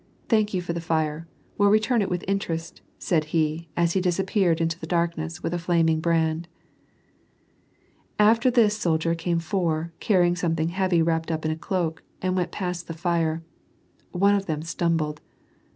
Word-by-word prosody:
Thank 215 -2 +3
you 185 -2 -1
for 170 - -3
the 170 - -3
fire; 160 -1 -1 0.3
we'll 205 0 +5
return 215 +3 +3
it 195 - -1
with 180 -1 -3
interest," 170 -4 -3 0.2
said 160 -4 0
he, 155 +1 -1
as 170 -1 +2
he 190 - +1
disappeared 185 -1 +1
into 165 +1 -1
the 160 - -7
darkness, 170 -1 -2
with 165 - -2
a 175 - -1
flaming 165 -2 +2
brand. 160 0 0 1.7
After 225 +4 +5
this 230 -4 +4
soldier 165 -4 +1
came 170 +1 -1
four, 165 -1 -1
cariying 175 -4 +3
something 165 -2 0
heavy 180 -2 +2
wrapped 165 0 0
up 160 -1 -2
in 155 - +1
a - - -1
cloak, 160 -1 -2 0.2
and 185 0 -1
went 180 -1 -1
past 180 -3 -4
the 165 - -6
fire. 165 -1 0 0.7
One 200 +3 +3
of 200 -1 0
them 155 -2 -2
stumbled. 165 -2 -1
170 Hz, 170 wpm, -25 LUFS, 160-185 Hz, 1.7 s, we'll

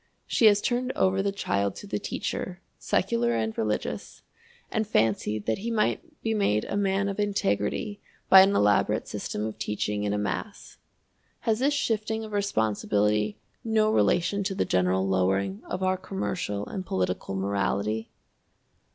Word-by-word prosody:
She 225 - +4
has 205 -1 +5
turned 250 +2 0
over 190 0 +2
the 200 0 0
child 100 - -1
to - - -9
the - - -3
teacher, - - -4 0.2
secular 120 0 +1
and 110 -1 -1
religious, 105 -1 -3 0.5
and 220 -1 0
fancied 110 - +1
that 110 - 0
he 225 +4 -3
might 300 +8 -1
be 225 - +1
made 150 - +1
a - - -3
man 200 0 +1
of 200 0 -3
integrity 205 - -1 0.3
by 190 - +10
an 195 +1 +4
elaborate 105 0 +2
system 105 - -4
of 110 - -6
teaching 105 0 -2
in 105 - 0
a 105 - 0
mass. 105 - -4 0.6
Has 220 -1 +1
this 285 +3 +2
shifting 220 -3 -1
of 215 - -8
responsibility 105 - +1 0.3
no 220 -1 +2
relation 200 -1 +2
to 195 0 -1
the - - +1
general 90 +1 +1
lowering 95 +1 +1
of 185 +1 -4
our 185 0 +2
commercial 180 - -3
and 190 - -5
political 95 - -2
morality? 100 +3 -1
120 Hz, 155 wpm, -27 LUFS, -, 0.6 s, by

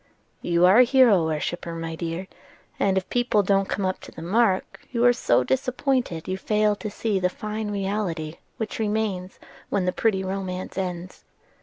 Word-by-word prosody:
"You 170 0 +3
are 190 +6 +7
a - - +9
hero 245 -8 +5
worshipper, 165 +2 -3
my 165 0 -4
dear; 170 +3 -4 0.5
and 190 -1 +2
if 190 - -1
people 245 -4 +2
don't 195 0 +2
come 200 - -1
up 185 - -1
to - - -12
the 160 - -9
mark 195 +1 +1
you 240 -1 +1
are 245 - +7
so 125 - +2
disappointed 255 - 0
that - - -18
you 185 - -2
fail 210 +1 +2
to 210 - -5
see 205 -1 -1
the 180 0 +1
fine 215 +2 -4
reality 195 -6 -2 0.2
which 220 -1 -4
remains 210 -4 -2 0.3
when 195 -3 0
the 180 - +2
pretty 200 -4 +1
romance 185 -1 -4
ends. 180 -1 -5
195 Hz, 180 wpm, -24 LUFS, 180-215 Hz, 0.5 s, a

